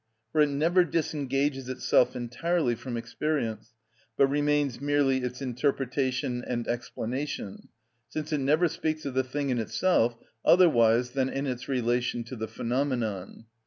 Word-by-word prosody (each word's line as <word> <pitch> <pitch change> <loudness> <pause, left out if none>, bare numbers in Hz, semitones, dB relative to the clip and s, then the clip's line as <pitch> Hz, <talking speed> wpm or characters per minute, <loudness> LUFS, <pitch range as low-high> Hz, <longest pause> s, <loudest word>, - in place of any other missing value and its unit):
For 155 - +3
it 150 - +4
never 165 +6 +3
disengages 140 -4 -1
itself 130 -1 +2
entirely 125 +4 0
from 120 +1 -5
experience, 115 -2 -3 0.4
but 140 - +6
remains 145 -2 +1
merely 145 -2 +2
its 125 +1 -4
interpretation 130 -1 -1
and 120 -1 -3
explanation, 120 -1 -4 0.4
since 155 +4 -4
it 150 - +1
never 150 +6 +3
speaks 155 -1 -3
of 140 - -3
the 130 0 +2
thing 140 +2 -2
in 125 - 0
itself 120 -1 +1 0.3
otherwise 125 -9 +5
than 135 0 0
in 135 +1 -2
its 125 0 -4
relation 120 -1 0
to 120 +3 -8
the 110 -1 -4
phenomenon. 115 -4 -2
130 Hz, 140 wpm, -28 LUFS, 120-145 Hz, 0.4 s, but